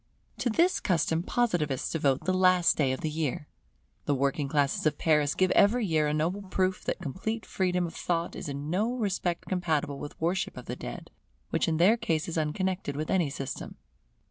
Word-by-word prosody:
To 245 - +1
this 340 +11 +3
custom 165 -2 +1
Positivists 175 - 0
devote 140 -4 +1
the 185 - +2
last 185 -1 +4
day 140 -4 +2
of 130 - -3
the 155 - -1
year. 150 -2 -2 0.6
The 145 - +2
working 140 +2 0
classes 145 +1 +1
of 150 - 0
Paris 150 -2 +2
give 185 0 +2
every 225 +3 +4
year 155 -4 +2
a 150 - 0
noble 170 +6 0
proof 185 -1 -1
that - - -1
complete 205 - -3
freedom 180 -1 0
of 165 - -6
thought 170 -1 -2
is - - -5
in 140 +2 -4
no 215 +7 +1
respect 190 -6 -1
compatible 160 -6 -1
with 145 - -8
worship 175 +4 -1
of - - -8
the - - -4
dead, - - -8 0.4
which - - +1
in 160 -1 +1
their 195 +8 +5
case 160 -7 -1
is 170 - -4
unconnected 165 0 -1
with 155 +2 -3
any 175 -6 +2
system. 135 -1 -6
165 Hz, 195 wpm, -28 LUFS, 150-185 Hz, 0.6 s, their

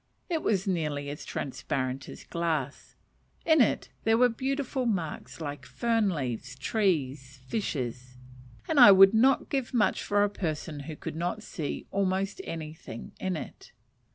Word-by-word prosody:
It 325 -2 +1
was 195 -3 +1
nearly 150 -6 -1
as 150 - -7
transparent 135 -1 -3
as - - -10
glass; 160 -5 -3 0.5
in 315 -3 +5
it 230 - +2
there 225 0 +4
were 250 +1 +5
beautiful 265 +1 -2
marks 175 -9 -3
like 145 -3 -5
fern 225 - +1
leaves, 130 -5 -3
trees, 140 - -1
fishes 125 - -3 0.5
and 315 -3 +2
I 240 -5 +11
would 195 +1 +8
not 255 +5 +4
give 265 -2 -2
much 215 -3 +2
for 205 0 +2
a - - +4
person 160 -5 -3
who 155 - -5
could - - -6
not 175 +6 -2
see 160 -9 -5
almost 195 - 0
anything 155 -7 -7
in 185 -3 -1
it. - - -9
175 Hz, 150 wpm, -28 LUFS, 145-220 Hz, 0.5 s, I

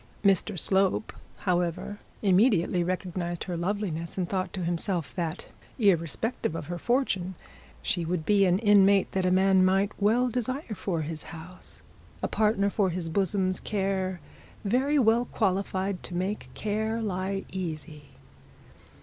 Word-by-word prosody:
Mr 195 0 +2
Slope, 190 +5 +3 0.3
however, 180 +2 -1 0.2
immediately 185 -3 +3
recognised 175 -1 -3
the 180 - -3
loveliness, 170 -2 -3
and 180 -2 0
thought 185 -1 -2
to 185 - -4
himself, 170 0 -2
that 170 -1 -4 0.3
irrespective 195 - +1
of 160 -2 -4
her 175 +3 -5
fortune, 195 - 0 0.5
she 175 - 0
would 165 -1 -2
be 200 +2 +4
an 180 0 +3
inmate 200 -2 +5
that 190 -1 0
a - - +4
man 190 0 +4
might 195 +2 +3
well 230 +5 +3
desire 250 +2 -3
for 180 -5 -2
his 155 0 -5
house, 170 +2 -12 0.4
a - - +2
partner 210 -2 +2
for 195 -2 +1
his 170 -1 -3
bosom's 185 +1 0
care 190 -2 -1 0.5
very 265 +8 +2
well 235 -1 +4
qualified 195 -3 -1
to 175 - -7
make 190 +4 -2
care 220 +2 -1
lie 195 -2 -2
easy. 155 -4 -5
190 Hz, 140 wpm, -28 LUFS, 175-205 Hz, 0.5 s, inmate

